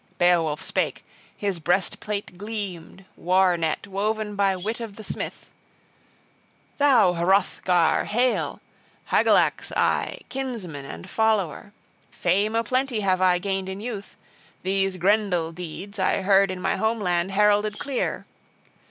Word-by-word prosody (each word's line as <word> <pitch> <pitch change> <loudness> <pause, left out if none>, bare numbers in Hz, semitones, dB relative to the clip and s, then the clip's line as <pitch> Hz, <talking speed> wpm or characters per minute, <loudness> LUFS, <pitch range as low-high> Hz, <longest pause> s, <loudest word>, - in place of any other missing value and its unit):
Beowulf 165 -4 +2
spake, - - -1 0.3
his 200 -4 -2
breastplate 190 +3 -1
gleamed, 195 -3 -6
war 185 0 +3
net 160 +1 -2
woven 210 +2 -2
by 200 -1 +2
wit 210 +6 -4
of 225 -4 -7
the 220 - -10
smith: - - -6 1.3
"Thou 250 -10 +5
Hrothgar, 180 -1 +2
hail! 245 +3 0 0.5
Hygelac's - - +3
I, - - 0
kinsman 230 - -5
and 85 -10 -9
follower. 210 -4 0 0.4
Fame 200 +5 0
a 230 - +2
plenty 255 0 0
have 185 -2 +1
I 180 -1 +4
gained 190 0 -2
in 190 +1 -5
youth! 210 -3 -7 0.5
These 195 0 0
Grendel 180 -3 +1
deeds 180 +4 -8
I 190 - +1
heard 195 0 +4
in 185 -1 -4
my - - 0
home 220 +1 0
land 175 -2 0
heralded 210 +1 +3
clear. 275 -3 -2
195 Hz, 125 wpm, -24 LUFS, 180-215 Hz, 1.3 s, Thou